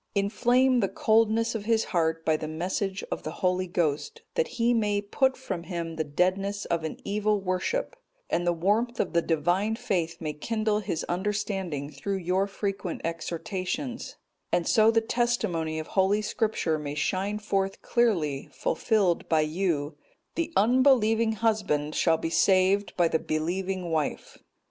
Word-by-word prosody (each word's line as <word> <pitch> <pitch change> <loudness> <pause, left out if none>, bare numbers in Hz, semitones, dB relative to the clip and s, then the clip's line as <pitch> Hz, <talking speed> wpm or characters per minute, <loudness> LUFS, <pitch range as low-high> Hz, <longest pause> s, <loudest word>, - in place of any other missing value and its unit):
Inflame 245 +5 +3
the 195 -4 +1
coldness 225 +1 +2
of 215 -3 -4
his 225 0 +2
heart 165 -3 0
by 160 - +3
the 155 0 -4
message 190 +5 -2
of - - -2
the - - -5 0.2
Holy 185 0 +1
Ghost, 170 - -1
that 485 - +1
he 235 +1 +3
may 210 -3 +1
put 260 +6 +1
from 190 -10 -4
him 170 -2 -5
the 160 - -1
deadness 190 +7 0
of 165 -1 -1
an 160 - -4
evil 210 +1 +1
worship, 195 - -2 0.3
and 170 - 0
the - - +5
warmth 210 +8 0
of 185 - -1
the 170 - +4
Divine 175 +7 +1
faith 185 -9 -2
may 155 -2 -3
kindle 215 +5 -1
his 170 -6 -3
understanding 190 -6 -2
through 200 +3 -3
your 185 +2 0
frequent 195 -3 -4
exhortations; 185 - -4 0.4
and 170 - +1
so 220 0 +5
the 225 0 +3
testimony 220 -10 0
of 155 - -3
Holy 200 +2 +2
Scripture 210 -8 0
may 145 -1 -5
shine 195 +7 -1
forth 195 -2 -2
clearly, 170 - +1
fulfilled 190 -1 0
by 160 -1 +4
you, 155 -2 -1 0.4
'The 335 0 -2
unbelieving 230 -2 +4
husband 195 -10 0
shall 165 -1 +3
be 165 - -3
saved 190 +2 +3
by 175 -2 +4
the 160 - +1
believing 180 +3 -2
wife. 155 -3 -2
195 Hz, 155 wpm, -27 LUFS, 165-220 Hz, 0.4 s, the